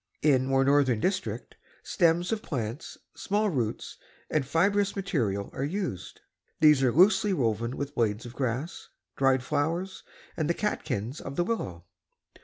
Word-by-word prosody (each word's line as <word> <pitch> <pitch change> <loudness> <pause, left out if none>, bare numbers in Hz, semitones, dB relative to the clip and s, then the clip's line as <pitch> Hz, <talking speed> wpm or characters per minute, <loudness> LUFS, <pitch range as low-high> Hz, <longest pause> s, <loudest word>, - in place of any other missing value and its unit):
In 130 -4 +3
more 135 0 +3
northern 135 -4 +3
district, 190 - -2 0.3
stems 175 +1 +2
of 220 -1 -1
plants, 125 - -5 0.2
small 210 +1 0
roots 120 -8 -3 0.3
and 155 - +2
fibrous 200 +8 +1
materials 120 - -1
are 135 - -3
used. 155 - -4 0.4
These 150 -3 +6
are 130 -2 +3
loosely 195 - +4
woven 115 - -1
with 140 0 -4
blades 115 -2 0
of 120 - -9
grass, 130 +5 -3 0.3
dry 135 -1 +3
flowers 165 +8 -2 0.3
and 155 -2 -1
the 170 - +2
catkins 130 - -3
of 135 - -7
the 175 - +2
willow. 95 - -4
145 Hz, 145 wpm, -28 LUFS, 120-180 Hz, 0.4 s, These